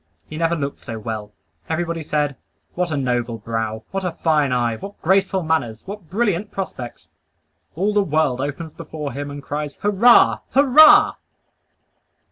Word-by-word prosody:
He 155 - -9
never 165 +1 +1
looked 140 -3 -4
so 115 - -6
well. 110 -1 -6 0.4
Everybody 165 0 -2
said, 150 -2 -1 0.4
"What 180 0 -1
a 155 - -2
noble 120 -3 -1
brow! 110 0 -4
What 195 0 -3
a 180 -2 -2
fine 150 -5 +1
eye! 120 -2 +1
What 200 - -10
graceful 190 +1 +2
manners! 140 -9 -1
What 195 -4 -9
brilliant 205 -1 0
prospects!" 130 -11 -7 0.7
All 200 +6 0
the 205 - +3
world 155 -7 0
opens 145 +3 -5
before 150 -3 -6
him 145 +2 -5
and 145 0 -8
cries, 145 0 -4
"Hurrah! 210 +4 +5 0.2
Hurrah!" 285 +3 +7
155 Hz, 150 wpm, -21 LUFS, 130-190 Hz, 0.7 s, Hurrah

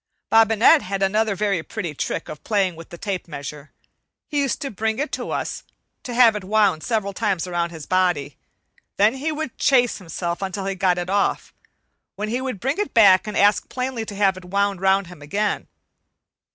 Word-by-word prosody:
Bobinette 225 +7 +6
had 195 +1 -3
another 210 +1 +1
very 200 -3 0
pretty 175 -2 -5
trick - - -3
of 150 - -9
playing 195 -5 +1
with 165 0 -12
the 170 - -9
tape 195 -1 -4
measure. 150 -1 -8 0.5
He 295 - -2
used 275 -3 0
to 275 - -3
bring 220 +1 -1
it 295 +3 -2
to - - -4
us - - -3 0.4
and 245 - -5
have 235 -3 +6
it 210 - -4
wound 200 -4 +2
several 215 -4 -1
times 195 -5 -1
around 175 -1 -1
his 160 -3 -9
body; 175 -7 0 0.6
then 210 +3 +4
he 285 +4 -2
would 310 -4 -5
"chase 245 -5 +3
himself" 170 0 -4
until 195 0 -3
he 195 - -1
got 185 -2 +1
it 175 0 -3
off, 200 0 0 0.6
when 210 +1 -4
he 245 +3 -1
would 255 -6 -4
bring 270 - -1
it 415 - -2
back 200 -3 +6
and 210 - -3
ask 205 +1 +3
plainly 255 -2 -3
to 205 - -7
have 195 -2 +2
it 185 - -11
wound 200 0 0
round 195 0 +3
him 175 -3 -13
again. 200 +8 -2
200 Hz, 195 wpm, -22 LUFS, 180-225 Hz, 0.6 s, Bobinette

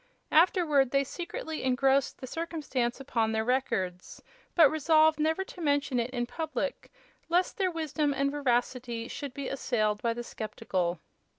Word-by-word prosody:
Afterward 315 -5 +4
they 275 +2 +2
secretly 320 +1 -5
engrossed 265 +1 +2
the 260 - -7
circumstance 280 -6 -2
upon 230 -5 0
their 220 0 0
records, 190 -8 -1 0.4
but 330 -4 +8
resolved 315 0 +4
never 320 +5 +1
to 365 - -11
mention 285 -4 +1
it 235 +1 -1
in 245 -2 -2
public, 315 - -4 0.4
lest 355 +7 +1
their 380 -1 +2
wisdom 310 -3 -1
and 275 0 0
veracity 245 -4 -1
should 280 -1 -6
be 280 -2 -4
assailed 215 -6 0
by 230 -1 0
the 240 - -4
skeptical. 190 -7 -3
275 Hz, 150 wpm, -29 LUFS, 240-315 Hz, 0.4 s, but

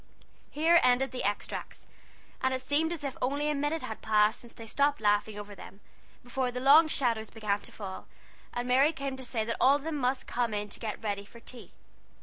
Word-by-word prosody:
Here 330 +3 +4
ended 255 +2 +3
the 255 - -4
extracts; 205 0 -3 0.6
and 260 0 +1
it 260 - -4
seemed 305 +4 +1
as 330 -4 -4
if 275 -2 -3
only 285 +4 0
a - - 0
minute 295 +3 -1
had 220 - -6
passed 215 0 +3
since 235 - -11
they 230 - -11
stopped 285 +5 +1
laughing 210 0 +1
over 205 0 -7
them, 200 0 -12 0.4
before 250 +1 -1
the 250 0 -4
long 290 +5 +7
shadows 230 -7 0
began 210 -2 -1
to - - -10
fall, 190 -3 -8 0.4
and 245 0 -3
Mary 270 +5 +4
came 275 -2 -4
to 265 - -7
say 230 -3 -2
that 230 - -2
all 270 +2 +6
of 285 - -3
them 320 -1 -3
must 255 -1 0
come 235 -3 -1
in 205 0 -3
to - - -6
get 220 0 -5
ready 200 -2 -2
for 235 +3 -15
tea. 240 +1 -10
250 Hz, 215 wpm, -30 LUFS, 220-280 Hz, 0.6 s, long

